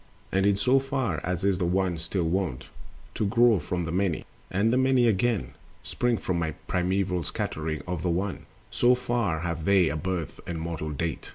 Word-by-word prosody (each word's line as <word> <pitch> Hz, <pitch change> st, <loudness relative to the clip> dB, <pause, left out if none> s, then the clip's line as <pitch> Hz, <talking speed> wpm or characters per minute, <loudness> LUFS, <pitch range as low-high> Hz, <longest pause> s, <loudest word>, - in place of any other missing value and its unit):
And 95 Hz, +1 st, +3 dB
in 100 Hz, -1 st, +3 dB
so 130 Hz, +6 st, +4 dB
far 130 Hz, -, -2 dB
as 90 Hz, +1 st, -2 dB
is 100 Hz, -2 st, +2 dB
the 90 Hz, -, +1 dB
One 95 Hz, 0 st, +1 dB
still 85 Hz, +2 st, -2 dB
wont 80 Hz, -6 st, -1 dB, 0.4 s
To -, -, -2 dB
grow 115 Hz, 0 st, +4 dB
from 90 Hz, -1 st, -3 dB
the 80 Hz, -, -3 dB
Many, 90 Hz, -2 st, 0 dB, 0.2 s
and 105 Hz, +5 st, +2 dB
the -, -, +3 dB
Many, 130 Hz, -2 st, +4 dB
again, 110 Hz, -, +1 dB, 0.3 s
Spring 120 Hz, -1 st, 0 dB
from 85 Hz, -4 st, -1 dB, 0.2 s
primeval 90 Hz, 0 st, 0 dB
scattering 80 Hz, -2 st, -3 dB
of 90 Hz, -3 st, -3 dB
the 90 Hz, -, 0 dB
One, 95 Hz, +3 st, -2 dB, 0.2 s
So 125 Hz, +1 st, +4 dB
far 120 Hz, -10 st, -1 dB
have 85 Hz, -2 st, -3 dB
they 95 Hz, -4 st, +4 dB
a 70 Hz, -, -2 dB
birth 85 Hz, 0 st, -3 dB
and 85 Hz, -2 st, -3 dB
mortal 80 Hz, -1 st, -4 dB
date. 80 Hz, +1 st, -3 dB
95 Hz, 185 wpm, -27 LUFS, 85-105 Hz, 0.4 s, so